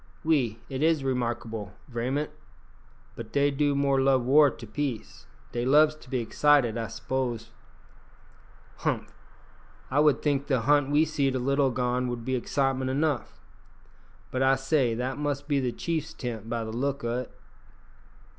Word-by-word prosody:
"Oui, 130 -9 +2
it 135 0 -4
is 160 -2 +3
remarkaibel, 115 -5 -3
vraiment. 130 +5 -2 0.8
Bot 115 -1 -8
dey 140 0 +2
do 145 0 +1
more 140 -1 +2
love 135 -2 +3
war 145 +4 +6
to 115 -2 -10
peace. 120 - -5 0.2
Dey 120 - -2
loves 150 +4 +5
to 140 - -17
be 130 - 0
excit 145 +3 +4
ed, 115 - -3
I 115 -1 -2
s'pose." 120 -1 -3 1.3
"Humph! - - -2 0.8
One 145 +3 +3
would 150 -2 +3
think 140 -2 0
the 130 -4 +1
hunt 145 +2 +3
we 150 +2 +4
seed 140 -4 0
a - - +2
little 140 +2 +2
agone 125 0 0
would 120 -2 -4
be 130 - -1
excitement 130 +1 0
enough. 145 -1 -1 0.9
But, 130 - -1
I 135 0 +5
say, 135 -3 +1
that 130 +4 -3
must 145 -1 -1
he 145 -2 +2
the 125 -2 -1
chiefs 160 +3 -3
tent, 115 -3 -5
by 115 -1 -2
the 110 - -5
look 140 +3 -2
o't." 120 +2 -2
135 Hz, 160 wpm, -27 LUFS, 120-145 Hz, 1.3 s, war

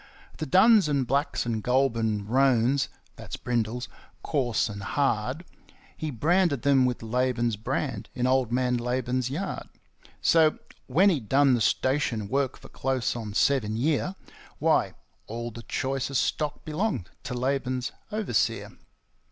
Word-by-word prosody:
The - - -4
duns 220 -8 +6
and 140 -3 +1
blacks 140 +3 0
and 110 -3 -2
ŌĆ£Goulburn 115 -5 +1
roansŌĆØ 130 +2 +3 0.3
(that's - - -7
brindles), 120 0 -2 0.4
coarse 125 -7 0
and 100 -2 -7
hard, 135 - -1 0.5
He 155 - -4
branded 150 - +1
them 135 -3 +4
with 125 -2 -3
Laban's 120 0 0
brand, 105 - -3
in 125 - 0
Old 130 -2 +2
Man 125 0 +1
Laban's 125 +1 -1
yard; 175 +9 -4 0.5
So, 160 -2 +4 0.3
when 185 +10 +4
he'd 130 - -3
done 140 -1 +5
the 120 - +1
station 120 -4 +1
work 135 0 0
for - - -14
close 130 -2 -1
on 110 -4 -6
seven 115 -6 +2
year, 155 +8 0 0.4
Why, - - +2 0.3
all 120 +2 -5
the 115 - -9
choicest 135 +1 -1
stock 150 -2 -2
belonged 155 - -2
to 125 - -4
Laban's 130 +1 -1 0.2
overseer. 210 - 0
130 Hz, 135 wpm, -27 LUFS, 120-140 Hz, 0.5 s, duns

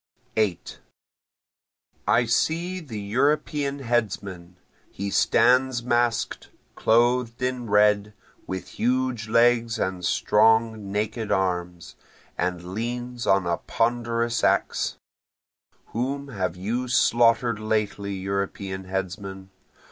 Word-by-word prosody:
8 105 -6 -1 1.3
I 120 +1 +4
see 170 +10 0
the 130 -11 -7
European 140 +6 0
headsman, 100 -8 -2 0.4
He 100 +1 -4
stands 125 +2 +3
mask'd, 120 -1 0 0.3
clothed 120 +1 +2
in 125 -2 -2
red, 105 0 +3 0.3
with 95 -1 -5
huge 125 -2 0
legs 115 0 +3
and 95 -1 -2
strong 110 +2 +2
naked 110 +2 -2
arms, 90 -2 -2 0.4
And 90 0 -3
leans 120 +2 -4
on 95 -1 +3
a 85 -1 0
ponderous 115 0 -1
axe. - - +1 1.0
(Whom 140 +4 -2
have 95 -8 -2
you 115 +8 -2
slaughter'd 120 -1 +3
lately 105 -2 -1
European 95 0 -3
headsman? 95 +1 -5
110 Hz, 95 wpm, -25 LUFS, 95-120 Hz, 1.3 s, I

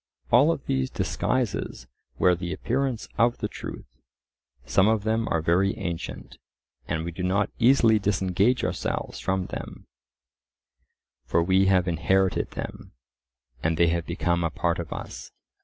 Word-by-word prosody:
All 135 +7 +6
of 140 - -4
these 65 -1 0
disguises 120 - -2 0.3
wear 90 - +4
the 90 0 -3
appearance 125 +3 -2
of 120 +1 +3
the - - -2
truth; - - -8 0.8
some 95 +7 +3
of 110 -2 +2
them 110 +1 0
are 80 -1 0
very 95 +5 +2
ancient, 85 -6 -6 0.5
and 80 +1 -2
we 85 - -3
do 85 - -7
not 95 +3 +1
easily 115 -3 +5
disengage 100 +4 +1
ourselves - - -3
from 95 -1 -1
them; - - -8 1.4
for 85 - +1
we 95 +2 +3
have 95 -1 +3
inherited 95 +3 +1
them, - - -7 0.7
and 80 +1 0
they 85 0 +4
have 85 0 -1
become 85 0 0
a 80 - +1
part 85 +1 -1
of 85 - -6
us. - - -7
95 Hz, 145 wpm, -26 LUFS, 85-110 Hz, 1.4 s, All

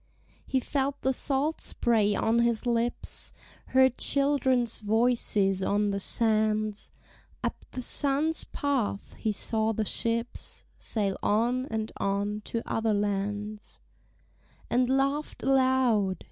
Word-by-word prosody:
He 265 - +1
felt 275 +2 -1
the 265 - +2
salt 285 +4 0
spray 215 -3 +1
on 225 +1 +2
his 235 0 +1
lips; 235 0 0 0.4
Heard 260 -1 +3
children's 265 -4 +2
voices 210 -3 +1
on 205 +1 +1
the 200 - -2
sands; 215 0 0 0.5
Up - - -4
the 255 - -6
sun's 290 +5 +1
path 260 -8 -2
he 220 - -2
saw 220 +1 -1
the 220 0 -1
ships 230 +3 -3
Sail 200 -4 -2
on 240 +5 +1
and 220 -2 -3
on 200 +1 -1
to 230 - -3
other 225 -1 0
lands; 205 +1 -3 0.9
And 250 +1 +2
laugh'd 275 +3 0
aloud. 255 -7 +3
230 Hz, 120 wpm, -28 LUFS, 210-260 Hz, 0.9 s, Heard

